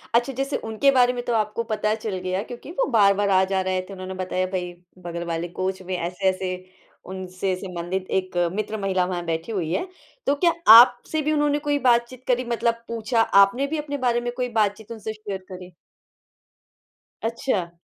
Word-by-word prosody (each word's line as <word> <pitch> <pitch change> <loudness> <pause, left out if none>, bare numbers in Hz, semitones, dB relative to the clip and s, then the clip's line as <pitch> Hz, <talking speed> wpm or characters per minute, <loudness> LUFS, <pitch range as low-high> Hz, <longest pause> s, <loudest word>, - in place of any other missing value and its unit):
अच्छा 245 +3 +2
जैसे 275 +1 -1
उनके 225 +5 +2
बारे 250 -1 +4
में 245 -1 -4
तो 240 - -1
आपको 215 +1 0
पता 215 0 0
चल 215 -3 -4
गया 185 +1 -1
क्योंकि 245 +6 -8
वो - - +4
बार-बार 200 -2 +4
आ 190 0 +4
जा 190 -1 +2
रहे 185 0 -1
थे, 190 +2 -11
उन्होंने 185 0 -7
बताया 185 0 -2
भई 180 -2 -4 0.3
बगल 170 0 -4
वाले 170 +1 -3
कोच 185 +1 -3
में 185 0 -4
ऐसे-ऐसे 185 +1 -1 0.6
उनसे 185 0 -3
संबंधित 185 0 -4
1 185 -1 -8 0.2
मित्र 215 +1 -3
महिला 190 -2 +1
वहाँ 175 -1 -4
बैठी 165 +6 -3
हुई 170 -6 -2
है। 365 - -1 0.4
तो 285 - +2
क्या 340 - +6 0.2
आपसे 245 +6 +6
भी 305 +1 0
उन्होंने 295 -1 +2
कोई 290 -1 0
बातचीत 245 0 +1
करी 250 0 +2
मतलब 230 0 0
पूछा, 230 0 0
आपने 210 +7 +4
भी 315 +2 -2
अपने 290 -1 -4
बारे 240 -2 +1
में 240 0 -3
कोई 250 -1 -1
बातचीत 220 0 -1
उनसे 220 -1 -5
शेयर 205 -3 -6
करी? 180 -1 -9 1.5
अच्छा। 225 -6 -1
210 Hz, 185 wpm, -24 LUFS, 185-245 Hz, 1.5 s, क्या